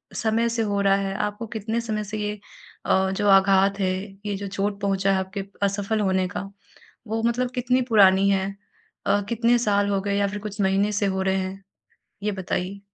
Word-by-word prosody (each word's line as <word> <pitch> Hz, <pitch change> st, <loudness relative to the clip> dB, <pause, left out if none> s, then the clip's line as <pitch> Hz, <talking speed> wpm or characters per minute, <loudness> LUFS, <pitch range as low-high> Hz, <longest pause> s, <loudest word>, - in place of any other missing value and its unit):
समय 225 Hz, +1 st, +1 dB
से 230 Hz, 0 st, -1 dB
हो 200 Hz, -1 st, 0 dB
रहा 195 Hz, 0 st, +4 dB
है? 195 Hz, -1 st, -2 dB
आपको 210 Hz, +3 st, -3 dB
कितने 220 Hz, +1 st, -3 dB
समय 215 Hz, -2 st, -3 dB
से 210 Hz, +1 st, -5 dB
ये 210 Hz, 0 st, -3 dB, 0.5 s
अ, 190 Hz, 0 st, +2 dB
जो 205 Hz, +2 st, -1 dB
आघात 195 Hz, +1 st, +4 dB
है, 185 Hz, -1 st, +1 dB, 0.3 s
ये 205 Hz, -1 st, -1 dB
जो 200 Hz, -, -5 dB
चोट 200 Hz, +1 st, -2 dB
पहुँचा 195 Hz, -1 st, +1 dB
है -, -, +2 dB
आपके 190 Hz, +1 st, -4 dB, 0.2 s
असफल 200 Hz, +2 st, 0 dB
होने 190 Hz, -2 st, +1 dB
का 195 Hz, +1 st, -6 dB, 0.6 s
वो 225 Hz, +1 st, -2 dB
मतलब 240 Hz, +2 st, 0 dB
कितनी 250 Hz, +1 st, +1 dB
पुरानी 195 Hz, -3 st, +5 dB
है? 190 Hz, -1 st, +1 dB, 0.6 s
अ, 205 Hz, 0 st, +3 dB
कितने 235 Hz, +1 st, +2 dB
साल 205 Hz, -3 st, +1 dB
हो 195 Hz, -1 st, +1 dB
गए 200 Hz, +1 st, -1 dB
या 200 Hz, 0 st, +2 dB
फिर 205 Hz, +1 st, -5 dB
कुछ 210 Hz, 0 st, -6 dB
महीने 195 Hz, +2 st, +2 dB
से 205 Hz, 0 st, 0 dB
हो 190 Hz, 0 st, -1 dB
रहे 190 Hz, 0 st, +1 dB
हैं? 190 Hz, +1 st, -4 dB, 0.6 s
ये 210 Hz, -, 0 dB
बताइए। 190 Hz, 0 st, -3 dB
200 Hz, 200 wpm, -24 LUFS, 195-215 Hz, 0.6 s, पुरानी